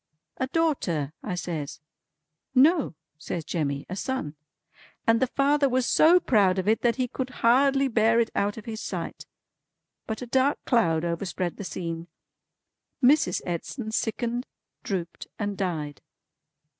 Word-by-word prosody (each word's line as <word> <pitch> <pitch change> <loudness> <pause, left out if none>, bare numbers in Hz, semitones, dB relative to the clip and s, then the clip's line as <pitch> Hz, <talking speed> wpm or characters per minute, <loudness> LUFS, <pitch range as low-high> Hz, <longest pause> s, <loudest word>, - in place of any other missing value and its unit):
"A 260 - -1
daughter," 225 - 0
I 185 - -3
says. 160 -5 -4 0.8
"No," 290 - +4 0.2
says 165 -1 -4
Jemmy, 140 -4 -2
"a 185 - -5
son. 200 - -3 0.7
And 225 0 +4
the 260 - +2
father 280 +2 +2
was 255 0 +1
so 340 +6 +6
proud 200 - +3
of 190 +1 -1
it 220 +1 +3
that 235 -1 +2
he 255 -1 0
could 260 +1 -4 0.2
hardly 270 +3 +4
bear 230 -1 +3
it 230 -1 +1
out 205 +2 0
of 225 - -9
his 220 -1 -5
sight. - - -5 0.8
But 220 +2 -4
a - - -4
dark 265 +4 +2
cloud 170 - +2
overspread 175 +1 -2
the - - -6
scene. 165 -2 -5 1.0
Mrs. 255 - +4
Edson 215 - -4
sickened, 240 +3 -2 0.3
drooped, 175 -4 -4
and 205 -1 -2
died." 155 -7 -3
220 Hz, 145 wpm, -26 LUFS, 175-260 Hz, 1.0 s, so